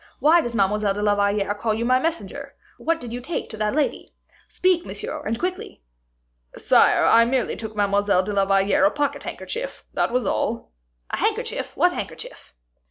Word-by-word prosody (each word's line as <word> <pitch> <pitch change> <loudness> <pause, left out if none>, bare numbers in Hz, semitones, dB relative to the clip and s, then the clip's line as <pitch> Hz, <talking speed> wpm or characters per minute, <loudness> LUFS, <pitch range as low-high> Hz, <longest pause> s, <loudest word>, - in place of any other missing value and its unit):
Why 330 +3 +5
does 240 -5 -5
Mademoiselle 205 0 +1
de 205 - -3
la 205 -1 +3
Valliere 200 0 +1
call 215 +1 -1
you 230 +2 -2
my 255 +1 +3
messenger? 330 +4 -4 0.2
What 330 0 0
did 235 -4 -8
you 245 - -4
take 320 +6 -4
to 220 - -8
that 210 +3 -1
lady? 300 -2 -1 0.4
Speak, 365 -2 +1
monsieur, - - -6
and 225 +1 -1
quickly." 365 - -5 0.7
"Sire, - - +4
I 230 - +6
merely 250 +2 0
took 220 -1 -7
Mademoiselle 200 -2 +2
de 205 +2 -4
la 195 -1 +2
Valliere 195 0 +2
a - - +6
pocket 290 +5 -2
handkerchief, - - -6
that - - 0
was 250 0 0
all." 230 +1 -2 0.4
"A - - -1
handkerchief, - - -2
what - - +3
handkerchief?" - - -8
225 Hz, 180 wpm, -23 LUFS, 205-285 Hz, 0.7 s, I